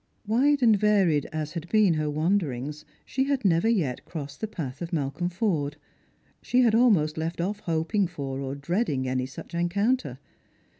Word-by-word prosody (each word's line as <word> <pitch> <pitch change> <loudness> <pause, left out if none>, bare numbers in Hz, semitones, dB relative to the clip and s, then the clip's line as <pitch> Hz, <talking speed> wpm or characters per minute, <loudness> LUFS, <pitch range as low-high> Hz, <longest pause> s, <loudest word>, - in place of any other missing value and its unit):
Wide 265 +6 +3
and 225 -3 +6
varied 195 -8 +2
as 155 -1 -4
had 170 -1 -6
been 215 -5 +4
her 155 -1 -1
wanderings, 150 -3 -1 0.2
she 265 +1 0
had 275 -5 -1
never 180 +4 +3
yet 155 - 0
crossed 145 -4 -7
the 220 - -1
path 150 -9 -6
of 170 0 -5
Malcolm 160 +2 -1
Forde. 165 -7 -1 0.6
She 250 - +2
had 235 -3 +4
almost 195 -11 +3
left 165 +2 -3
off 200 +4 -2
hoping 170 +2 0
for 140 -6 -5
or 135 0 -4
dreading 140 - -1
any 130 0 -1
such 135 - -11
encounter. 175 - 0
170 Hz, 165 wpm, -26 LUFS, 145-210 Hz, 0.6 s, and